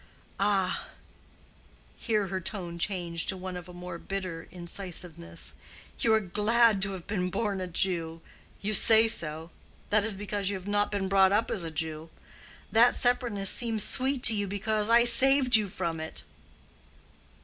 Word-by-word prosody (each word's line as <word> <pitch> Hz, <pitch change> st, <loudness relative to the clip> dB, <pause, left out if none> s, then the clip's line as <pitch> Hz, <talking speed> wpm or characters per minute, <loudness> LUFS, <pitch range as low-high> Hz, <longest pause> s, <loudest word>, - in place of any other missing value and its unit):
Ah!"—here 200 Hz, +2 st, -5 dB
her 190 Hz, 0 st, -4 dB
tone 175 Hz, -3 st, -6 dB
changed 170 Hz, -3 st, -3 dB
to 190 Hz, -, -2 dB
one 185 Hz, 0 st, -7 dB
of 180 Hz, 0 st, -9 dB
a -, -, -10 dB
more 180 Hz, -1 st, -9 dB
bitter 185 Hz, -4 st, -6 dB
incisiveness—"you 175 Hz, +4 st, -6 dB
are 220 Hz, -, +4 dB
glad 215 Hz, +2 st, +1 dB
to 195 Hz, 0 st, 0 dB
have 180 Hz, -3 st, -9 dB
been 185 Hz, -3 st, -3 dB
born 200 Hz, 0 st, -3 dB
a 185 Hz, -, -4 dB
Jew. 165 Hz, -2 st, -2 dB, 0.4 s
You 215 Hz, +2 st, -2 dB
say 220 Hz, +3 st, +6 dB
so. 160 Hz, -5 st, -1 dB, 0.4 s
That 210 Hz, 0 st, +3 dB
is 220 Hz, -2 st, +1 dB
because 200 Hz, 0 st, -4 dB
you 200 Hz, -, -3 dB
have 190 Hz, 0 st, -9 dB
not 205 Hz, 0 st, 0 dB
been 200 Hz, -2 st, -3 dB
brought 190 Hz, 0 st, +3 dB
up 210 Hz, +3 st, 0 dB
as 190 Hz, -, -2 dB
a 165 Hz, -, -5 dB
Jew. 160 Hz, 0 st, -5 dB, 0.6 s
That 235 Hz, +2 st, +4 dB
separateness 240 Hz, -5 st, 0 dB
seems 225 Hz, -3 st, +1 dB
sweet 260 Hz, +4 st, +3 dB
to 225 Hz, -, +7 dB
you 205 Hz, -1 st, -2 dB
because 210 Hz, +2 st, -2 dB
I 235 Hz, +1 st, +5 dB
saved 260 Hz, +1 st, +7 dB
you 210 Hz, -3 st, +2 dB
from 170 Hz, -3 st, -4 dB
it." 160 Hz, 0 st, -6 dB
195 Hz, 160 wpm, -27 LUFS, 180-215 Hz, 0.6 s, to